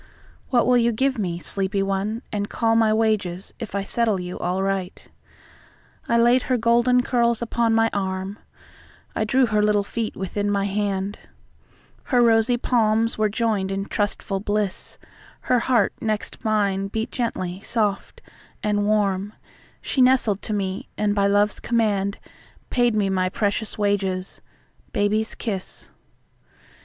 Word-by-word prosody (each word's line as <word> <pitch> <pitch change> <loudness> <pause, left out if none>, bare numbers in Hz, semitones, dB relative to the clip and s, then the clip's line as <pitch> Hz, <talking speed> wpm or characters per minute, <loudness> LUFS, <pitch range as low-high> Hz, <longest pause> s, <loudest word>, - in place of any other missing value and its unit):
What 245 -2 +3
will 250 - +4
you 235 0 +3
give 265 +2 0
me, 175 -4 -2
sleepy 195 +2 -1
one, 200 +5 -2
and 205 -1 -2
callMy 225 -1 +2
wages, 205 -5 -1
if 225 -4 -6
I 200 - 0
settle 220 -2 0
you 180 0 -6
all 180 +2 -1
right?I 195 +4 -6
laid 240 +2 +4
her 255 - +3
golden 240 +2 +3
curls 235 -2 +1
upon 230 -1 +1
my 225 0 +4
arm,I 195 +2 -6
drew 260 +4 +3
her 215 -2 +1
little 210 -1 +2
feet 220 +2 -4
within 205 +2 -2
my 200 -1 +1
hand, 200 0 -2 0.9
Her 250 - +2
rosy 230 +1 +4
palms 230 -2 +1
were 215 -1 +3
joined 210 -3 0
in 195 0 -2
trustful 205 -1 -2
bliss, 205 -1 -2 0.4
Her 250 - +2
heart 235 -4 +2
next 215 -1 -3
mine 200 -3 +1
beat 220 +3 -3
gently, 185 -6 -3
soft 210 -4 -2 0.4
and 210 -1 +1
warmShe 205 -1 +1 0.7
nestled 250 -6 +4
to 215 - -4
me, 190 -2 -3
and, 210 -1 +1
by 200 -1 +2
Love's 205 +1 +2
command, 205 -4 0 0.5
Paid 240 -3 +2
me 200 -2 +1
my 185 -1 +1
precious 205 +2 -2
wages—"Baby's 205 +2 -2
Kiss." 195 -5 -5
210 Hz, 135 wpm, -23 LUFS, 195-230 Hz, 0.9 s, will